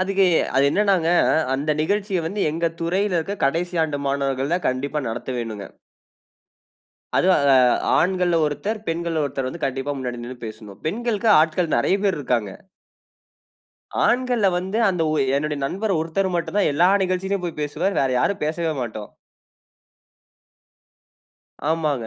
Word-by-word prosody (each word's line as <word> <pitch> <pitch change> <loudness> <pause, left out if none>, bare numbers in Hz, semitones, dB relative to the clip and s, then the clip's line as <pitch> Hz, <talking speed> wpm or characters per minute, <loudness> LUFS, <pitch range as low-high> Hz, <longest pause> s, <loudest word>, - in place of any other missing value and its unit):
அதுக்கு 195 +1 +2 0.3
அது 135 - +4
என்னனா? 195 -3 +2 0.5
அந்த 145 +3 -1
நிகழ்ச்சிய 200 +1 -1
வந்து 200 +5 -3
எங்க 165 +2 -1
துறையில 185 +3 0
இருக்க 195 +5 -3
கடைசி 175 +5 -1
ஆண்டு 145 -2 -3
மாணவர்கள் 135 +1 -1
தான் 180 - -1
கண்டிப்பா 140 +3 -2
நடத்த 115 +3 -5
வேணுங்க. 110 -4 -5 1.5
அதுவும் 185 -4 +4
அ - - +6 0.4
ஆண்கள்ல 180 -1 +2
ஒருத்தர், 150 +10 -3
பெண்கள்ல 165 -1 -1
ஒருத்தர் 135 -2 -3
வந்து 165 +5 -5
கண்டிப்பா 135 +2 -3
முன்னாடி 125 -2 -4
நின்னு 125 +1 -8
பேசனும். 110 -2 -10
பெண்களுக்கு 225 +4 -1
ஆட்கள் 160 +1 +1
நறைய 195 - +2
பேர் 195 - +2
இருக்கங்க. 115 -7 -1 1.5
ஆண்கள்ல 245 -3 +2
வந்து 190 +4 -3
அந்த 180 -3 0
ஓ - - 0 0.2
என்னோட 150 0 -2
நண்பர் 195 +6 -1
ஒருத்தர் 175 +4 -1
மட்டும் 170 +3 -3
தான் 200 - +3
எல்லா 170 +5 +4 0.2
நிகழ்ச்சிலுயும் 185 +1 -2
போய் 165 - -6
பேசுவார். 165 +7 -1
வேற 135 - +2
யாரும் 200 +8 0
பேசவே 160 +1 -1
மாட்டோம். 110 -3 -6 2.6
ஆமாங்க. 150 -8 -1
165 Hz, 135 wpm, -22 LUFS, 140-190 Hz, 2.6 s, அ